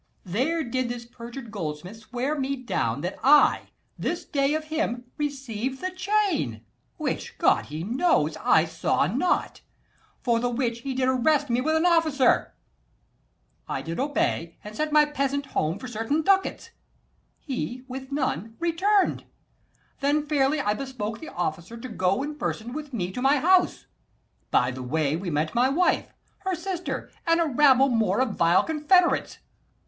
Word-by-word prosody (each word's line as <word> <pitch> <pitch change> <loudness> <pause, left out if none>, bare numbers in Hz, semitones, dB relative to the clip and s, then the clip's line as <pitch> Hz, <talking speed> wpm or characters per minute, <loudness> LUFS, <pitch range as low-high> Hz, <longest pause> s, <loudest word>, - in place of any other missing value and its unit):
There 270 - 0
did 255 -1 -2
this 240 -1 -5
perjured 235 0 -9
goldsmith 175 +1 -5
swear 245 +6 -3
me 275 -1 -1
down 145 - -2
That 180 - -4
I 290 +2 +5 0.3
this - - -2
day 280 +1 +1
of 310 - -2
him 310 -6 -2
received 265 -3 -3
the 370 0 -3
chain, 370 - 0 0.3
Which, - - -3
God - - +3
he 155 +2 -5
knows, 225 - +1
I 160 - +4
saw 160 -3 0
not: 255 - 0 0.6
for 235 -2 +2
the 245 +1 0
which 235 -1 -1
He 265 +2 -4
did 255 0 +1
arrest 275 +2 +2
me 240 +1 +2
with 315 +4 +1
an 320 +2 +2
officer. 320 -7 +3 1.1
230 - - -2
I - - -5
did 165 +1 -5
obey; 260 - -1
and 210 +1 -9
sent 305 +5 -1
my 300 0 +6
peasant 280 -1 -1
home 160 - -1
For 255 - -8
certain 245 +7 -1
ducats: 385 +2 +1 0.7
he 255 -2 -5
with 265 +1 -7
none 230 - -2
return'd. 365 +4 +1 0.7
Then 290 +2 +1
fairly 290 0 +2
I 210 -7 +1
bespoke 230 -3 -5
the 320 - -8
officer 175 +5 -4
To 235 - -7
go 195 0 0
in 300 +1 -6
person 235 +2 -3
with 300 -1 -6
me 190 -7 -3
to 250 - -5
my 275 +3 +4
house. 360 +5 +3 0.6
By 125 0 +2
the 130 +1 -7
way 145 +3 0
we 175 +2 -4
met 155 0 -1
my 250 +2 +3
wife, 350 +6 +1 0.3
her 380 -2 -2
sister, 360 +1 -4 0.2
and 330 0 +4
a 335 - +3
rabble 275 -2 +5
more 220 -5 +1
235 260 - +2
Of 200 - -7
vile 170 +2 +5
confederates. 320 +3 +2
260 Hz, 165 wpm, -26 LUFS, 215-300 Hz, 1.1 s, my